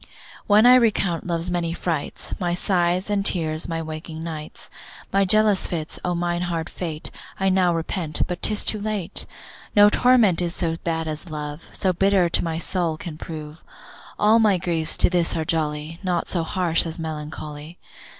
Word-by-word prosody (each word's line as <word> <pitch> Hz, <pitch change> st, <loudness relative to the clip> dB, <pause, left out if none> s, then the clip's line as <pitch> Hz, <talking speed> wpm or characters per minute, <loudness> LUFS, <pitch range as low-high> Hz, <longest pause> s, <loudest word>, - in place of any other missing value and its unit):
When 210 Hz, +2 st, +6 dB
I 250 Hz, -, +9 dB
recount 210 Hz, -9 st, +2 dB
love's 170 Hz, 0 st, -1 dB
many 170 Hz, -1 st, -1 dB
frights, 165 Hz, -4 st, -3 dB
My 175 Hz, -2 st, 0 dB
sighs 180 Hz, 0 st, +1 dB
and 205 Hz, -1 st, 0 dB
tears, 160 Hz, -5 st, +1 dB
my 165 Hz, -1 st, -3 dB
waking 160 Hz, 0 st, -7 dB
nights, 155 Hz, -2 st, -7 dB, 0.4 s
My 195 Hz, 0 st, +4 dB
jealous 215 Hz, 0 st, +3 dB
fits; 160 Hz, -3 st, -4 dB
O 180 Hz, -1 st, -1 dB
mine 175 Hz, 0 st, -1 dB
hard 170 Hz, -2 st, -3 dB
fate 160 Hz, -4 st, -3 dB, 0.3 s
I 195 Hz, 0 st, +2 dB
now 185 Hz, -2 st, +3 dB
repent, 165 Hz, -1 st, -2 dB
but 180 Hz, -1 st, -5 dB
'tis 210 Hz, -1 st, +2 dB
too 215 Hz, -, +1 dB
late. 210 Hz, -3 st, -2 dB, 0.5 s
No 205 Hz, 0 st, +8 dB
torment 225 Hz, -7 st, +4 dB
is 175 Hz, -1 st, -1 dB
so 165 Hz, -2 st, -1 dB
bad 165 Hz, -1 st, -2 dB
as 155 Hz, +3 st, -5 dB
love, 150 Hz, 0 st, -6 dB
So 185 Hz, -1 st, 0 dB
bitter 195 Hz, -1 st, +3 dB
to -, -, +2 dB
my 165 Hz, -1 st, -2 dB
soul 170 Hz, -2 st, -1 dB
can 155 Hz, -2 st, -8 dB
prove. 155 Hz, -1 st, -8 dB, 0.6 s
All 215 Hz, +2 st, +5 dB
my 210 Hz, -4 st, +4 dB
griefs 165 Hz, -3 st, -1 dB
to -, -, +3 dB
this 175 Hz, -2 st, +1 dB
are 160 Hz, -, -2 dB
jolly, 155 Hz, 0 st, -2 dB
Naught 180 Hz, -2 st, -1 dB
so 175 Hz, -, 0 dB
harsh 170 Hz, 0 st, +1 dB
as 160 Hz, -, -4 dB
melancholy. 155 Hz, 0 st, -7 dB
170 Hz, 175 wpm, -23 LUFS, 160-190 Hz, 0.6 s, I